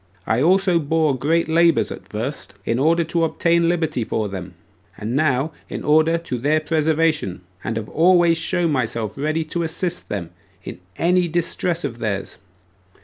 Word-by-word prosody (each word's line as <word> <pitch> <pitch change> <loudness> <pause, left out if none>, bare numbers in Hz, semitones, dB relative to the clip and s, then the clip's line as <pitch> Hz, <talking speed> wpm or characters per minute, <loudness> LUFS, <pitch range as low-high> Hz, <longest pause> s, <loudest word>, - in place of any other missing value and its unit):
I 115 +3 +1
also 180 +2 +3
bore 155 -1 +1
great 160 +6 +1
labors 165 0 +3
at 95 - -9
first, 110 +1 -5
in 115 - 0
order 165 +4 +3
to 165 +1 -1
obtain 170 +1 +2
liberty 160 -7 0
for 110 -1 -2
them, 95 -2 -7 0.4
and 110 +4 -3
now 140 0 +1 0.2
in - - -5
order 155 +2 +4
to 150 -7 -4
their 150 +5 +2
preservation; 155 - 0 0.2
and 115 - -2
have 110 -1 -4
always 170 0 +4
showed 175 -1 0
myself 115 -5 -1
ready 155 +3 -1
to 170 +2 -3
assist 170 +2 -3
them 90 -5 -4 0.3
in - - -8 0.2
every 180 +1 +2
distress 170 +1 -1
of 120 -5 -4
theirs. 100 -4 -3
155 Hz, 160 wpm, -21 LUFS, 120-170 Hz, 0.4 s, order